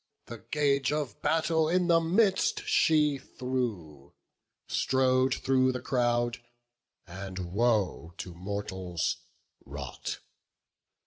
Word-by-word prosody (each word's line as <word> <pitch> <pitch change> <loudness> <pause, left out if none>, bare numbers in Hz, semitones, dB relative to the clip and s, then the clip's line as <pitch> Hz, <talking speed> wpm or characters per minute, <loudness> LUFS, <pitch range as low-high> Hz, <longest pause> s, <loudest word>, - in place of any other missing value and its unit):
The 115 - -8
gage 140 -1 +1
of 150 -4 -3
battle 160 0 +2
in 180 +1 +2
the 170 -1 +5
midst 200 - +2
she 155 - +3
threw, 110 - -4 0.5
Strode 130 0 +2
through 130 -1 +2
the 125 - -3
crowd, 120 -2 0 0.7
and 95 -1 -7
woe 105 -6 +1
to 90 - -6
mortals 95 -2 -3 0.5
wrought. 70 -1 -6
125 Hz, 100 wpm, -29 LUFS, 95-150 Hz, 0.7 s, the